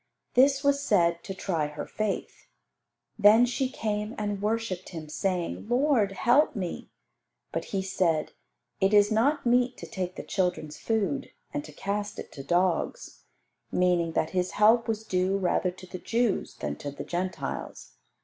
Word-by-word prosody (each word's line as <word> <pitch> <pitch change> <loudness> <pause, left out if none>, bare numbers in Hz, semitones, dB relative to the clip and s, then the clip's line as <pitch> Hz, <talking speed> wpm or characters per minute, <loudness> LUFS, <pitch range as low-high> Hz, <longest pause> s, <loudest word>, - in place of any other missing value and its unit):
This 270 +2 +4
was 280 0 +3
said 170 -8 +2
to 195 - -5
try 165 -6 -1
her 150 0 -6
faith. 215 -2 -4 0.7
Then 215 +4 +7
she 255 +2 -1
came 210 -2 -3
and 205 -2 -2
worshipped 210 -4 -2
Him, 160 -3 -8
saying, 180 +4 -2
"Lord, 245 -6 +3
help 250 +8 +3
me." 185 -5 -4 0.6
But - - -3
He 195 -1 -2
said, 175 -5 0 0.5
"It 195 +2 +3
is 205 0 +5
not 270 +7 +2
meet 245 +1 +3
to - - -8
take 185 -4 -4
the - - -6
children's 180 -5 -2
food 225 +4 -1 0.2
and 295 0 -2
to - - -10
cast 205 +1 -3
it - - -8
to 135 - -8
dogs;" 180 - -1 0.5
meaning 175 -2 +2
that 155 - 0
His 180 -1 -1
help 225 +3 +5
was 220 -1 -2
due 185 -1 +1
rather 185 -1 +1
to 185 +1 -10
the 185 0 -8
Jews 230 -1 0
than 75 0 -4
to 145 - -5
the 140 0 -7
Gentiles. 180 +4 -4
195 Hz, 160 wpm, -28 LUFS, 180-225 Hz, 0.7 s, Then